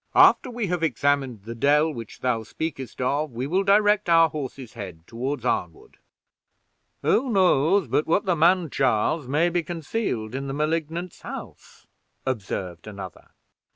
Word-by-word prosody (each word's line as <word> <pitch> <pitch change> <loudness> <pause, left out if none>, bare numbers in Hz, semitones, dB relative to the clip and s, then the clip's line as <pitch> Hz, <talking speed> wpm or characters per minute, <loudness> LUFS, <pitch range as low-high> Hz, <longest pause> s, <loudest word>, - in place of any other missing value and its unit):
After - - +6
we 240 -2 -3
have 180 -2 -1
examined 140 -6 0
the 115 +2 -6
dell 150 +6 +3
which 115 -4 -9
thou 125 -3 +1
speakest 135 +1 -6
of, 145 +4 0
we 120 +3 -3
will 180 +7 +1
direct 205 0 +3
our 165 -1 +6
horses' 135 -5 -6
heads 95 -8 -8
toward 130 +7 -4
Arnwood." 425 +2 -3 1.1
"Who 260 +2 +2
knows 185 - +3
but 150 - 0
what 195 +6 +2
the 180 -2 +2
man 170 0 +3
Charles 130 +3 +1
may 155 +6 +2
be 175 0 0
concealed 160 - -3
in 135 +1 -4
the 135 - -4
Malignant's 165 +3 -2
house?" - - -10 0.4
observed 95 -8 -4
another. 100 -4 -9
150 Hz, 150 wpm, -25 LUFS, 125-175 Hz, 1.1 s, After